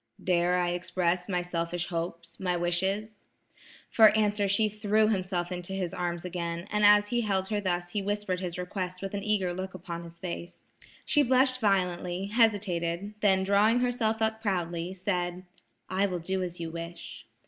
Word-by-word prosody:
"Dare 180 Hz, 0 st, +2 dB
I 175 Hz, -1 st, +1 dB
express 180 Hz, +1 st, -1 dB
my 180 Hz, -2 st, 0 dB
selfish 170 Hz, 0 st, -2 dB
hopes–my 170 Hz, +1 st, -3 dB
wishes?" 190 Hz, +5 st, -1 dB, 0.7 s
For 220 Hz, -2 st, +8 dB
answer 205 Hz, -1 st, +2 dB
she 200 Hz, +3 st, +3 dB
threw 215 Hz, +1 st, +2 dB
herself 185 Hz, -3 st, -1 dB
into 180 Hz, +1 st, -5 dB
his 185 Hz, -3 st, -2 dB
arms 175 Hz, -1 st, -3 dB
again, 170 Hz, 0 st, -4 dB
and 210 Hz, 0 st, +1 dB
as 205 Hz, 0 st, +6 dB
he 240 Hz, -1 st, +1 dB
held 195 Hz, -3 st, 0 dB
her 210 Hz, -1 st, 0 dB
thus 175 Hz, -2 st, -1 dB
he 205 Hz, -, -1 dB
whispered 205 Hz, -2 st, -2 dB
his 180 Hz, -2 st, -4 dB
request 180 Hz, 0 st, -4 dB
with 195 Hz, -, -4 dB
an 200 Hz, -1 st, -3 dB
eager 200 Hz, -4 st, +1 dB
look 185 Hz, +1 st, -5 dB
upon 170 Hz, -1 st, -6 dB
his 170 Hz, 0 st, -12 dB
face. 175 Hz, -1 st, -7 dB, 0.3 s
She 295 Hz, -, +4 dB
blushed 255 Hz, -1 st, +3 dB
violently, 180 Hz, -2 st, 0 dB
hesitated, 200 Hz, -4 st, +1 dB
then 190 Hz, -3 st, +3 dB
drawing 210 Hz, +5 st, +4 dB
herself 225 Hz, -3 st, 0 dB
up 220 Hz, 0 st, 0 dB
proudly 175 Hz, -4 st, -1 dB
said: 180 Hz, -1 st, -2 dB, 0.4 s
"I 195 Hz, +2 st, +1 dB
will 180 Hz, -2 st, -2 dB
do 190 Hz, +3 st, -2 dB
as 180 Hz, -1 st, -4 dB
you 165 Hz, -1 st, -4 dB
wish." 170 Hz, +1 st, -8 dB
185 Hz, 170 wpm, -29 LUFS, 175-205 Hz, 0.7 s, For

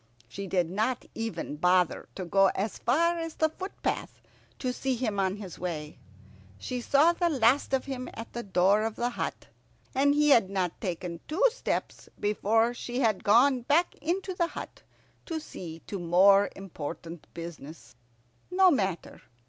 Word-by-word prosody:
She 195 Hz, +11 st, -7 dB
did 180 Hz, -2 st, +1 dB
not 220 Hz, +8 st, -1 dB
even 205 Hz, -9 st, -4 dB
bother 180 Hz, +1 st, +2 dB
to 185 Hz, -, -5 dB
go 195 Hz, +3 st, +4 dB
as 205 Hz, +3 st, -2 dB
far 335 Hz, +7 st, +2 dB
as 330 Hz, -1 st, -5 dB
the 315 Hz, -, +2 dB
footpath 380 Hz, +5 st, -4 dB, 0.4 s
to 255 Hz, -2 st, -2 dB
see 265 Hz, 0 st, -1 dB
him 220 Hz, -5 st, -2 dB
on 190 Hz, 0 st, +1 dB
his 200 Hz, -5 st, -9 dB
way. 155 Hz, -4 st, -5 dB, 0.6 s
She 250 Hz, -, -4 dB
saw 290 Hz, +7 st, +4 dB
the 345 Hz, 0 st, +1 dB
last 260 Hz, -2 st, +3 dB
of 265 Hz, -1 st, +1 dB
him 260 Hz, -2 st, -5 dB
at 225 Hz, +1 st, -8 dB
the 240 Hz, -, -3 dB
door 195 Hz, 0 st, +3 dB
of 220 Hz, 0 st, -2 dB
the 240 Hz, +1 st, -1 dB
hut, -, -, -4 dB, 0.5 s
and 285 Hz, +1 st, +3 dB
he 295 Hz, 0 st, +4 dB
had 230 Hz, -9 st, +5 dB
not 185 Hz, -3 st, -2 dB
taken 175 Hz, -3 st, -4 dB
two 355 Hz, +11 st, +1 dB
steps -, -, -4 dB
before 220 Hz, +3 st, +2 dB
she 245 Hz, +1 st, -4 dB
had 220 Hz, -5 st, +1 dB
gone 250 Hz, +5 st, +5 dB
back 300 Hz, +8 st, +2 dB
into 370 Hz, +5 st, -1 dB
the 345 Hz, -1 st, 0 dB
hut -, -, -8 dB, 0.5 s
to 325 Hz, -2 st, -2 dB
see 165 Hz, -, -9 dB
to 200 Hz, -, -5 dB
more 195 Hz, +4 st, +5 dB
important 165 Hz, -3 st, -7 dB
business. 155 Hz, -7 st, -9 dB, 0.5 s
No 370 Hz, 0 st, +5 dB
matter. 190 Hz, -, -2 dB
220 Hz, 165 wpm, -28 LUFS, 180-275 Hz, 0.6 s, had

